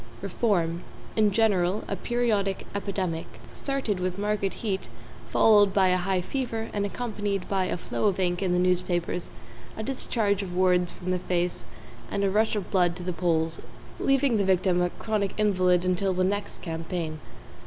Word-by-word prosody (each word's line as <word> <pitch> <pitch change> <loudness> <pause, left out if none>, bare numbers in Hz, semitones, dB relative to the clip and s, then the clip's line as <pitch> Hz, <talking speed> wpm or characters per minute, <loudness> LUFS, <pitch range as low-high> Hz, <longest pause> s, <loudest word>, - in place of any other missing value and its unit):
=REFORM= 175 -7 0 0.3
In 215 -1 +4
general, 200 -2 +2
a - - -2
periodic 215 -5 0
epidemic, 190 -5 -2 0.3
starting 265 -9 -2
with 180 0 -2
marked 205 -1 -1
heat, 195 -4 -3 0.4
followed 205 -3 +5
by 190 -2 +5
a 180 - +3
high 185 0 0
fever, 225 +1 -3
and 205 -1 0
accompanied 205 -4 -3
by 190 -2 +1
a 185 - -2
flow 180 - -3
of 195 -2 0
ink 175 -1 0
in 190 -2 +1
the 180 - +2
newspapers, 180 -1 0 0.5
a 220 - -3
discharge 220 -5 0
of 180 -3 -5
words 180 -1 +3
from 185 +1 -5
the 180 - +1
face 175 0 0 0.4
and 200 - -1
a 195 - +2
rush 220 +2 +2
of 200 -4 -4
blood 180 -3 +3
to 180 - -7
the 180 0 -2
polls, 165 -2 0 0.4
leaving 270 -3 +3
the 200 - +2
victim 185 -1 +2
a 180 - +2
chronic 210 0 -2
invalid 185 -4 +3
until 185 +1 +1
the 185 - +2
next 205 +2 -2
campaign. 165 -1 -4
190 Hz, 170 wpm, -27 LUFS, 180-210 Hz, 0.5 s, followed